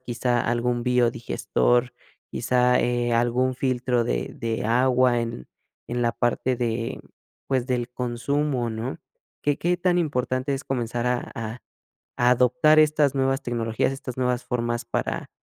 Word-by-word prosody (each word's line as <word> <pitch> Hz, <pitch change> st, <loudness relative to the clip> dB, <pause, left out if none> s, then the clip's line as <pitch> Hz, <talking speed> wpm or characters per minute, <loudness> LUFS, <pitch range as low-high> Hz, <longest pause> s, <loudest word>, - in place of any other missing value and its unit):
quizá 120 Hz, -1 st, 0 dB
algún 120 Hz, +1 st, 0 dB
biodigestor, 120 Hz, 0 st, +1 dB, 0.4 s
quizá, 125 Hz, 0 st, +2 dB
eh, 120 Hz, -1 st, 0 dB
algún 120 Hz, +2 st, +2 dB
filtro 125 Hz, -2 st, 0 dB
de -, -, -2 dB
de 115 Hz, -2 st, -3 dB
agua 125 Hz, +1 st, +3 dB
en 115 Hz, -, -5 dB, 0.4 s
en 120 Hz, +1 st, -2 dB
la 120 Hz, -1 st, +1 dB
parte 125 Hz, +1 st, 0 dB
de, 115 Hz, -1 st, -2 dB, 0.5 s
pues, 130 Hz, -2 st, 0 dB
del 125 Hz, -2 st, -1 dB
consumo?, 125 Hz, +1 st, -1 dB
¿no? 110 Hz, +4 st, -4 dB, 0.5 s
¿Qué 145 Hz, -1 st, +1 dB
qué 175 Hz, +1 st, +1 dB
tan 180 Hz, 0 st, +1 dB
importante 130 Hz, -3 st, -1 dB
es 135 Hz, -, -6 dB
comenzar 120 Hz, -2 st, -2 dB
a 125 Hz, 0 st, -1 dB
a 115 Hz, +1 st, -5 dB, 0.6 s
adoptar 125 Hz, +6 st, +4 dB
estas 150 Hz, -2 st, +3 dB
nuevas 135 Hz, 0 st, +1 dB
tecnologías, 115 Hz, +1 st, -1 dB
estas 130 Hz, -2 st, -7 dB
nuevas 125 Hz, -1 st, 0 dB
formas 120 Hz, -1 st, -2 dB
para -, -, -3 dB
125 Hz, 135 wpm, -24 LUFS, 120-130 Hz, 0.6 s, adoptar